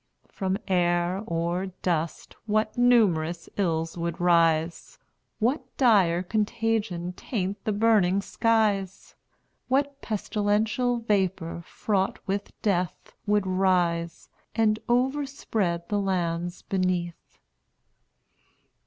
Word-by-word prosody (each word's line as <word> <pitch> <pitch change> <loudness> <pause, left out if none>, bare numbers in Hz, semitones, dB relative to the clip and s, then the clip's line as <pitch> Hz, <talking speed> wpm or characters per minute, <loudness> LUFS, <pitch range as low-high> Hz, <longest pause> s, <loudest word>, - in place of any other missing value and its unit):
From 190 0 -1
air, 175 0 +1
or 170 +3 -1 0.2
dust, 165 -2 -2
what 215 0 +1
numerous 185 -10 +3
ills 165 -3 -1
would 170 -1 -3
rise! 170 -1 +2 0.4
What 250 +7 +1 0.2
dire 190 -9 +4
contagion 210 -3 -1
taint 195 -1 -4
the 215 - +1
burning 205 -3 +3
skies! 210 -5 0 0.5
What 280 +1 0
pestilential 215 +3 0
vapor, 190 -7 -1
fraught 195 -3 -1
with 200 +1 -3
death, 180 -5 -1
Would 205 -1 +2
rise, 180 -3 0 0.3
and 215 -1 +2
overspread 245 -9 0
the 205 - 0
lands 175 -2 -2
beneath! 180 -3 -2
190 Hz, 90 wpm, -26 LUFS, 175-220 Hz, 0.5 s, dire